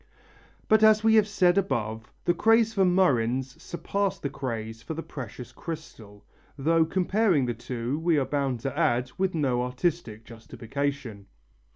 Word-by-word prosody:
But 220 0 +4
as 215 0 +6
we 220 0 +4
have 215 -2 +5
said 190 -3 +3
above, 110 - -3
the 175 - +3
craze 225 +4 +3
for 195 - +2
murrhines 130 -8 +1
surpassed 200 +2 -3
the 140 - -2
craze 115 -5 -5
for 160 - -6
the 165 - -5
precious 125 -2 -8
crystal, 110 -11 -9 0.3
though 160 +3 +3
comparing 185 - +1
the 120 - -1
two, 120 +4 -4
we 165 -1 +2
are 135 - +1
bound 135 -5 -1
to 135 - -4
add, 125 +1 +1
with 190 -2 0
no 130 -6 +1
artistic 125 -3 -2
justification. 120 -1 -5
140 Hz, 155 wpm, -27 LUFS, 120-180 Hz, 0.3 s, as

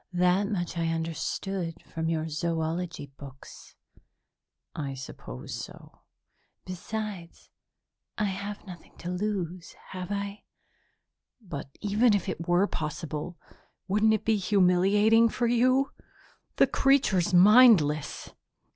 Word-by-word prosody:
That 180 +3 +2
much 175 -4 -3
I 165 - 0
understood 165 +2 -3
from 160 0 -4
your 160 -1 -1
zoology 165 -1 -3
books." 135 -2 -12 1.0
"I 140 -3 -4
suppose 65 - -9
so." - - -9 0.7
"Besides, 185 -1 -6 0.7
I 215 - 0
have 200 +2 -5
nothing 180 -4 -12
to 175 - -5
lose, 180 -3 -3 0.2
have 185 0 -6
I?" 200 0 -4 0.9
"But 145 - -8
even 210 +2 +3
if 200 - -2
it 165 - -4
were 175 +3 +4
possible, 155 0 -5 0.5
wouldn't 210 +3 +3
it 215 - -5
be 220 -1 +3
humiliating 205 +4 +4
for 240 - -1
you? 255 +3 +3 0.6
The - - +5
creature's 260 -10 +2
mindless!" 180 - +5
180 Hz, 110 wpm, -28 LUFS, 165-210 Hz, 1.0 s, The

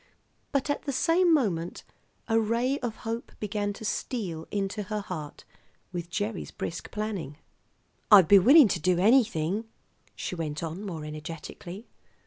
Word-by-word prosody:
But 275 -1 0
at 290 - -3
the 280 - -1
same 335 +6 +3
moment 185 - 0 0.4
a 225 -1 +3
ray 235 +5 0
of 240 -3 -3
hope 230 +1 -4
began 205 -1 -2
to 220 - -9
steal 190 -6 -3
into 200 +1 -2
her 210 -1 -1
heart 160 -7 -7 0.5
with 175 -1 -4
Gerry's 205 +3 -3
brisk 170 - -6
planning. 205 -9 -4 0.7
"I'd 195 -6 +9
be 200 +2 +8
willing 275 - +8
to 175 - 0
do 180 +2 +2
anything," 205 -2 +3 0.5
she - - -4
went 160 -3 -4
on 165 +5 -5
more 165 -7 -5
energetically. 165 +6 -8
205 Hz, 145 wpm, -28 LUFS, 170-230 Hz, 0.7 s, I'd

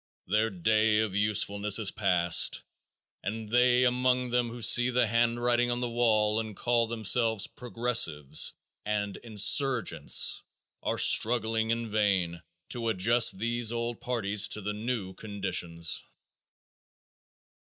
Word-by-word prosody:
Their 110 +3 0
day 110 +3 +1
of 110 -3 -1
usefulness 105 -1 +1
is 110 -4 -1
past 90 -5 +1 0.6
and 110 +1 -6
they 125 +1 +3
among 125 0 0
them 120 -1 0
who 120 0 -9
see 120 +3 +4
the 125 -1 +1
handwriting 120 +1 0
on 120 0 -2
the 125 - -3
wall 110 -2 +1
and 110 -2 -6
call 120 +1 0
themselves 110 -1 +1
"Progressives" 115 - 0 0.3
and 105 -1 -3
"Insurgents," 115 +2 +2 0.4
are - - -3
struggling 110 -1 +2
in 115 -1 -3
vain 95 -6 -1 0.3
to 115 -2 -3
adjust 115 +2 +2
these 115 +2 -2
old 120 0 -5
parties 105 -5 +1
to 105 - -3
the 105 +1 -4
new 105 -3 -5
conditions. 85 -6 -3
110 Hz, 120 wpm, -27 LUFS, 105-120 Hz, 0.6 s, see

